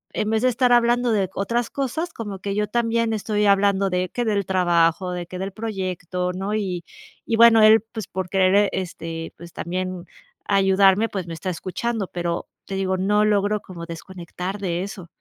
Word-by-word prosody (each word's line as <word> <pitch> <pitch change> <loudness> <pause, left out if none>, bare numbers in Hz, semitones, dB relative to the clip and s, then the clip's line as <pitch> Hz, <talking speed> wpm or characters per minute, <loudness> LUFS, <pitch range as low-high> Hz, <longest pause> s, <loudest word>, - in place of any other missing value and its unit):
en 215 - -1
vez 220 +2 +1
de - - +5
estar 245 +1 +2
hablando 240 0 +3
de 195 -4 +1
otras 235 +5 -1
cosas, 280 +6 -3
como 205 -4 -6
que 200 +1 -3
yo 210 0 0
también 230 0 0
estoy 210 0 0
hablando 195 0 +3
de 180 0 -1
que 240 -1 -2
del 200 -3 0
trabajo, 175 -1 +2
de 175 -1 -4
que 185 - -7
del 195 +1 -3
proyecto, 185 -4 -3
¿no? 195 +3 -3
Y 185 -5 -2 0.4
y 230 - 0
bueno, 230 -1 +7
él, 220 0 +7
pues, 220 -5 -4
por 185 -1 -4
querer. 195 +1 +4
este, 165 -3 -5
pues, 170 0 -12
también 185 0 -4 0.4
ayudarme, 195 +2 +4
pues, 190 -3 -4
me 165 - -5
está 185 +3 -4
escuchando. 205 +5 -3
Pero 170 -1 -3 0.2
te 195 - -5
digo, 190 -1 0
no 210 +3 +2
logro 205 0 +2
como 170 -3 -9
desconectar 180 +3 -6
de 180 -2 -2
eso. 195 -3 -8
195 Hz, 185 wpm, -23 LUFS, 180-215 Hz, 0.4 s, bueno